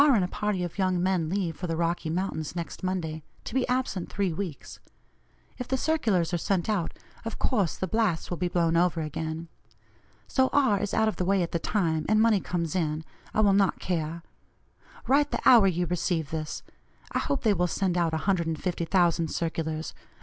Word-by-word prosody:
and 270 -9 +5
a - - 0
party 205 -1 -1
of 175 +3 -5
young 185 -2 +2
men 180 -4 +1
leave 180 -3 -1
for 180 - -5
the 165 - -1
Rocky 170 -1 -1
Mountains 165 -2 -2
next 170 -1 -5
Monday, 170 -4 -2 0.2
to - - -7
be 260 -1 +1
absent 250 -8 -1
three 195 -4 0
weeks. 170 -4 -6 0.8
If 250 - -4
the 265 - 0
circulars 215 - +1
are 175 - +1
sent 185 0 0
out, 205 -6 -1 0.3
of 225 - -5
course 205 - 0
the - - -1
blasts 195 -4 0
will 175 - -1
be 180 - 0
blown 170 -2 +1
over 170 -1 +2
again. 160 +2 -4 0.8
So 260 -1 +2
R. 260 -8 +3
is 205 0 -2
out 220 - +3
of 215 - -1
the - - 0
way 190 0 +2
at 170 - -4
the 170 - 0
time, 160 -6 0
and 215 0 +4
money 220 -2 +4
comes 170 -2 -2
in, 160 -3 -1 0.3
I 215 - +2
will 200 -2 +5
not 195 -1 +3
care. 165 -1 -3 0.8
Write 285 +2 +3
the - - -1
hour 230 -6 +8
you 175 -1 +1
receive 170 -3 -1
this. 155 -1 -4 0.5
I - - 0
hope 280 - -1
they 220 -3 +4
will 180 -2 +1
send 180 +1 0
out 170 -2 +2
150,000 170 0 +1
circulars. 160 -1 -3
180 Hz, 195 wpm, -27 LUFS, 165-205 Hz, 0.8 s, hour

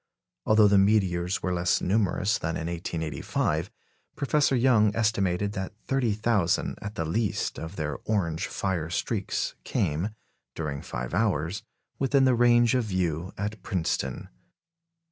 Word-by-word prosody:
Although 110 -1 +6
the 100 -1 +5
meteors 95 -3 +2
were 90 - 0
less 85 0 +2
numerous 100 +2 +1
than 80 +1 -2
in 80 - -4
1885, 85 -2 -2 0.5
Professor 140 -1 +2
Young 115 -5 +4
estimated 100 -3 +1
that 95 0 -4
30,000, 110 -7 +1
at 100 +1 -6
the 80 - -2
least, 105 +7 -1
of 80 +4 -7
their 75 -4 -3
orange 90 -6 0
fire 90 -5 -2
streaks 85 - -2
came, 80 +8 -1 0.5
during 70 -3 -3
five 60 +2 -5
hours, 95 -2 0 0.4
within 135 0 +3
the 130 - +4
range 120 0 +4
of 125 -3 +1
view 90 -3 -1
at 105 0 -4
Princeton. 90 -3 -2
95 Hz, 130 wpm, -27 LUFS, 85-110 Hz, 0.5 s, Although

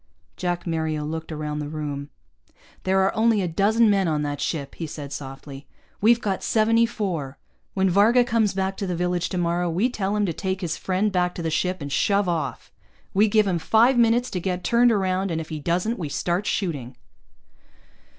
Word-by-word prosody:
Jack 175 -1 -2
Mario 160 -3 -2
looked 160 +1 -5
around 150 -1 -4
the 145 -1 -4
room. 145 -2 -5 0.8
"There 190 0 +3
are 190 - +1
only 220 -2 +3
a - - 0
dozen 210 +7 +3
men 195 -3 +3
on 150 -2 0
that 145 -1 -3
ship," 140 -4 -3
he 165 - -5
said 145 -2 -7
softly. 135 0 -8 0.3
"We've 235 +3 +5
got 200 -5 -2
seventy 230 +1 +3
four. 175 - -4 0.4
When 190 0 +2
Varga 210 +7 +5
comes 225 -4 +1
back 190 0 -1
to 195 - -3
the 180 - -2
village 180 0 -1
tomorrow, 175 -1 0
we 195 +10 +1
tell 200 -3 -2
him 210 -1 +1
to 170 - -2
take 190 +2 -3
his 165 -3 -2
friend 190 +3 0
back 180 -1 0
to 170 - -5
the 160 - -1
ship 180 +1 -1
and 140 - -6
shove 200 +5 +2
off. 170 -2 -3 0.4
We 205 +2 +4
give 215 0 +3
him 180 -3 0
five 230 +9 +4
minutes 240 +1 +3
to 180 - -2
get 180 0 -3
turned 240 +1 +4
around, 190 -2 0
and 165 -2 -1
if 160 - -7
he 155 - -4
doesn't, 180 +9 -1
we 155 -5 -3
start 175 +7 -1
shooting." 140 - -2
185 Hz, 200 wpm, -24 LUFS, 160-210 Hz, 0.8 s, We've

